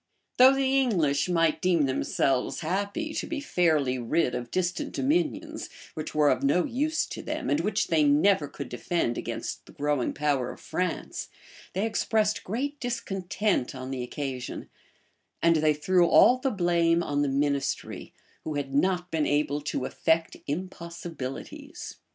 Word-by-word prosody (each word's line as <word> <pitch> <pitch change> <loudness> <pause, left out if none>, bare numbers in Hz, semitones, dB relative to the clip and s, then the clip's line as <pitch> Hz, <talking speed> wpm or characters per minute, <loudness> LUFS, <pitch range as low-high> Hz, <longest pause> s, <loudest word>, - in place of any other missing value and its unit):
Though 260 +2 +8
the 270 0 +2
English 170 - +1
might 165 -3 +2
deem 180 -4 +3
themselves 130 -1 0
happy 200 - -2
to - - -3
be 315 - -3
fairly 155 - +1
rid 125 +2 +1
of 120 -1 -4
distant 185 - -2
dominions, 310 +1 -1 0.2
which 155 -1 -6
were 150 -1 +5
of - - 0
no 145 +6 +3
use 295 +5 0
to - - -7
them, - - -3
and 295 - +3
which 215 -3 0
they 160 -2 +4
never 150 +3 +4
could 140 -1 -7
defend 120 0 -1
against - - -5
the - - -13
growing 145 -3 0
power 140 -4 0
of - - -12
France, 180 -2 -3 0.4
they 195 +4 0
expressed 215 -1 +1
great 280 +8 -3
discontent 195 - -1
on 130 0 -6
the 130 -2 -3
occasion: 130 0 -5 0.7
and 165 -1 +4
they 155 -1 +3
threw 175 +4 +3
all 255 +8 +6
the 270 +1 0
blame 170 -4 +2
on 145 -2 0
the 145 - +1
ministry, 140 0 -1 0.3
who 155 - -4
had 140 -1 -3
not 180 +4 +1
been 160 -2 +1
able 145 0 +1
to 140 -3 -2
effect 160 +3 0
impossibilities. 170 -4 -6
170 Hz, 155 wpm, -27 LUFS, 145-205 Hz, 0.7 s, Though